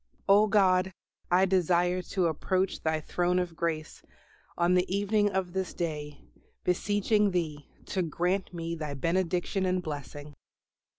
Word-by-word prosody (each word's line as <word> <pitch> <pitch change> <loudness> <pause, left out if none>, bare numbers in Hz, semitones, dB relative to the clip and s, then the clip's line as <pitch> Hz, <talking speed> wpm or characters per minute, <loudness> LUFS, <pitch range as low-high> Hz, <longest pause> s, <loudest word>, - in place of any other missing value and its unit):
O 205 +2 +6
God, 190 -3 +3 0.4
I 180 +2 +4
desire 180 -1 +2
to 180 0 -1
approach 185 +4 0
Thy 160 0 0
throne 180 +3 0
of 180 -2 -2
Grace 160 -2 -3 0.6
on 175 +1 +3
the 180 0 +2
evening 205 +1 +2
of 190 -3 -2
this 190 -2 -3
day, 150 -4 -4 0.4
beseeching 205 +3 +2
Thee 155 -6 -3 0.2
to 190 - -1
grant 180 +3 -1
me 170 -1 -4
Thy 155 -3 -4
benediction 180 +5 0
and 185 0 +1
blessing. 145 -1 -7
180 Hz, 135 wpm, -29 LUFS, 165-190 Hz, 0.6 s, O